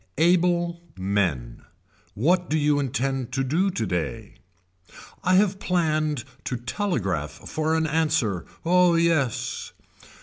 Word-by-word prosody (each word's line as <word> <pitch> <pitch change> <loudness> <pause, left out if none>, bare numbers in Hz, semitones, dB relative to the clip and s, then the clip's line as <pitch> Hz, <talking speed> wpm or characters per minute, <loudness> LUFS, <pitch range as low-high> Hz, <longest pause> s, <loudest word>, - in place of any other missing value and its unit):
Able 175 +1 +2 0.2
men. 90 -11 -1 0.5
What 175 - +2
do 155 - +2
you 145 -1 +2
intend 135 -1 -2
to 135 - 0
do 165 +9 +1
today. 110 - -3 0.9
I 185 +1 +3
have 195 0 +3
planned 155 -7 0 0.2
to 125 - -2
telegraph 115 - -2 0.2
for 155 +1 0
an 160 0 +1
answer, 150 - 0 0.2
Oh 180 0 +4
yes. 165 -7 0
155 Hz, 110 wpm, -25 LUFS, 115-170 Hz, 0.9 s, Oh